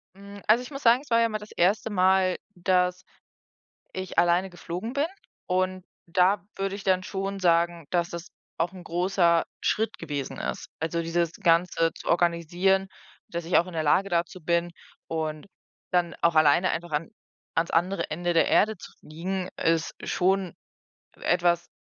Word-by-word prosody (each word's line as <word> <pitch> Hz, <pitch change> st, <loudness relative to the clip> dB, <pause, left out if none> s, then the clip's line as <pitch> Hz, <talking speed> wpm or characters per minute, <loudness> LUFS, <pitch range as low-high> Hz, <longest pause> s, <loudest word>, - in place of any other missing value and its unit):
Mm, 200 Hz, +1 st, -11 dB
also, 230 Hz, +4 st, +5 dB
ich 250 Hz, -, -10 dB
muss 275 Hz, 0 st, -7 dB
sagen, 235 Hz, +1 st, +5 dB
es 290 Hz, -, -18 dB
war 230 Hz, 0 st, +4 dB
ja 230 Hz, -, +3 dB
mal 215 Hz, -1 st, -3 dB
das 210 Hz, 0 st, -12 dB
1. 205 Hz, +5 st, +1 dB
Mal, 185 Hz, -1 st, +3 dB, 0.2 s
dass 180 Hz, +1 st, +1 dB, 0.9 s
ich 185 Hz, -1 st, -6 dB
alleine 175 Hz, +2 st, +3 dB
geflogen 180 Hz, +6 st, -6 dB
bin 285 Hz, +3 st, +1 dB, 0.4 s
und 185 Hz, 0 st, 0 dB, 0.2 s
da 180 Hz, +2 st, +3 dB
würde 195 Hz, 0 st, -2 dB
ich 200 Hz, -, -8 dB
dann 185 Hz, -1 st, +2 dB
schon 195 Hz, +1 st, -4 dB
sagen, 170 Hz, -2 st, +2 dB
dass 170 Hz, -1 st, 0 dB
das 170 Hz, +2 st, -7 dB, 0.3 s
auch 170 Hz, +2 st, 0 dB
großer 175 Hz, -1 st, +1 dB
'n -, -, -9 dB, 0.2 s
Schritt 220 Hz, +1 st, 0 dB
gewesen 145 Hz, -2 st, -5 dB
ist. -, -, -4 dB
Also, 165 Hz, +1 st, -1 dB
dieses 165 Hz, 0 st, 0 dB
Ganze 165 Hz, -1 st, +2 dB
zu -, -, -8 dB
organisieren, 175 Hz, +3 st, +2 dB, 0.4 s
dass 170 Hz, -1 st, -4 dB
ich 175 Hz, -, +2 dB
auch 175 Hz, -, +1 dB
in 180 Hz, -, -9 dB
der 160 Hz, -, 0 dB
Lage 190 Hz, +6 st, +3 dB
dazu 175 Hz, +1 st, -1 dB
bin 170 Hz, +1 st, +1 dB, 0.4 s
und 155 Hz, 0 st, -3 dB, 0.4 s
dann 175 Hz, -2 st, +1 dB
auch 170 Hz, -1 st, +4 dB
alleine 155 Hz, +4 st, +4 dB
einfach 170 Hz, 0 st, -4 dB
an 150 Hz, +8 st, -2 dB, 0.4 s
an's 165 Hz, +1 st, +1 dB
andere 180 Hz, +4 st, +1 dB
Ende 175 Hz, +2 st, -1 dB
der 165 Hz, -, +4 dB
Erde 215 Hz, +1 st, +3 dB
zu -, -, -12 dB
fliegen, 180 Hz, +4 st, -4 dB
ist 165 Hz, 0 st, +1 dB
schon 190 Hz, -1 st, +1 dB, 0.6 s
etwas, 175 Hz, -1 st, +1 dB
180 Hz, 170 wpm, -26 LUFS, 170-190 Hz, 0.9 s, also